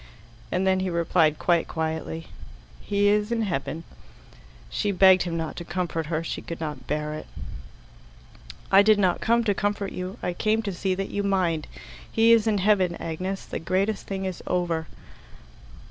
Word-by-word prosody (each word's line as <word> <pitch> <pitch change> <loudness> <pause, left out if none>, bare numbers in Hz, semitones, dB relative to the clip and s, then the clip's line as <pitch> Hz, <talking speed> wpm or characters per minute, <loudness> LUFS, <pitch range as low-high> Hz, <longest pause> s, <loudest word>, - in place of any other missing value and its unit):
and 185 +1 +1
then 190 0 +3
he 185 0 -1
replied 160 -3 +2
quite 170 -2 +2
quietly, 160 0 -3 0.5
"He 205 0 +1
is 210 +2 +2
in 230 -1 +1
heaven." 165 -4 -3 0.8
She 205 - -1
begged 190 -1 +6
him 170 -1 -2
not 160 -1 -3
to - - -4
comfort 170 -2 -3
her; 160 0 -1
she - - -4
could 170 - -7
not 150 -2 -5
bear 150 +1 -2
it. 155 - -7 1.4
"I 195 - +8
did 215 +1 +5
not 185 -3 +2
come 235 +1 +3
to 210 -3 +2
comfort 205 0 -1
you. 185 +4 -5
I 180 - -1
came 220 +4 +1
to 200 -3 -3
see 185 +1 -1
that 195 +1 -4
you 205 - -1
mind. 185 -6 0 0.4
He 225 +1 +4
is 230 -1 +5
in 215 -2 +2
heaven, 190 -3 +3
Agnes. 185 +5 -4
The - - -5
greatest 190 +5 -1
thing 195 -1 -3
is 185 -2 -4
over." 170 -3 0
185 Hz, 175 wpm, -25 LUFS, 165-205 Hz, 1.4 s, I